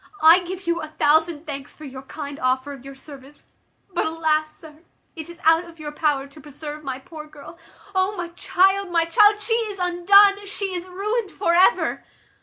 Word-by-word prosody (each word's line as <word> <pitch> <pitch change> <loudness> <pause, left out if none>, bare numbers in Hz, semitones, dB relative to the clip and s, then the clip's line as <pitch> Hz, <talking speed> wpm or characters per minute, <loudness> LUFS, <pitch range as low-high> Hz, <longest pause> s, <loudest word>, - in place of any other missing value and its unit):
I 325 +3 +8
give 370 +2 -7
you 340 0 -1
a 310 - -6
thousand 315 +1 +1
thanks 280 -2 -7
for 310 - -12
your 265 -1 -9
kind 285 +1 -8
offer 260 +2 -1
of 270 -3 -12
your 275 0 -10
service; 280 +1 -14 0.5
but, 350 - 0
alas! 310 -1 0
sir, 305 -1 -15 0.4
it 320 0 -8
is 345 0 -12
out 325 +2 +4
of 335 -1 -15
your 300 -1 -6
power 295 -2 0
to 280 +2 -15
preserve 295 +1 -9
my 265 -2 -4
poor 305 +2 -11
girl. 300 +3 -14 0.3
O 375 +2 0
my 350 -1 -4
child! 380 +2 +1
my 335 -1 +1
child! 415 +5 +4
she 420 +2 0
is 445 -3 -2
undone, 395 +3 +4
she 395 -1 -4
is 360 0 -5
ruined 410 +4 -3
for 355 -3 -1
ever!" 360 +2 +3
330 Hz, 195 wpm, -22 LUFS, 295-370 Hz, 0.5 s, I